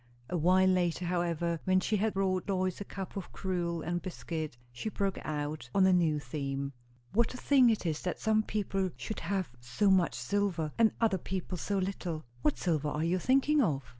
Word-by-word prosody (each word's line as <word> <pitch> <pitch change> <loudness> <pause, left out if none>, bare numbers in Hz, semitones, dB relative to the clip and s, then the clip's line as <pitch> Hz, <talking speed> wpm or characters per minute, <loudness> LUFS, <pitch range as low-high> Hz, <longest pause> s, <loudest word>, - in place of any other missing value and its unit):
A - - 0
while 180 +3 +4
later, 180 -1 +1
however, 170 -1 0
when 185 0 +4
she 215 +3 0
had 215 +1 0
brought 190 -1 0
Lois 185 -1 0
a - - -1
cup 195 -1 -7
of 195 -3 -6
gruel 175 -3 -2
and 175 0 -2
biscuit, 160 -6 -5
she 120 - -4
broke 200 -2 -1
out 150 -4 -3
on 195 - +6
a 190 - +5
new 165 -4 +3
theme. 140 -2 -4 0.4
"What 235 +3 +2
a - - -5
thing 260 -2 +5
it 220 -4 0
is, 155 -2 -1
that 180 - -3
some 220 0 +3
people 195 -3 -1
should 215 - -5
have 185 -2 -2
so 195 - +1
much 185 -3 +3
silver, 190 -7 -1
and 225 -1 +6
other 215 -5 +2
people 185 +1 -4
so 200 +3 -2
little!" 185 -4 -2 0.2
"What 150 - +2
silver 155 -4 0
are 150 +1 -1
you 180 +2 +1
thinking 275 - +3
of?" 145 - +1
185 Hz, 195 wpm, -31 LUFS, 165-200 Hz, 0.4 s, on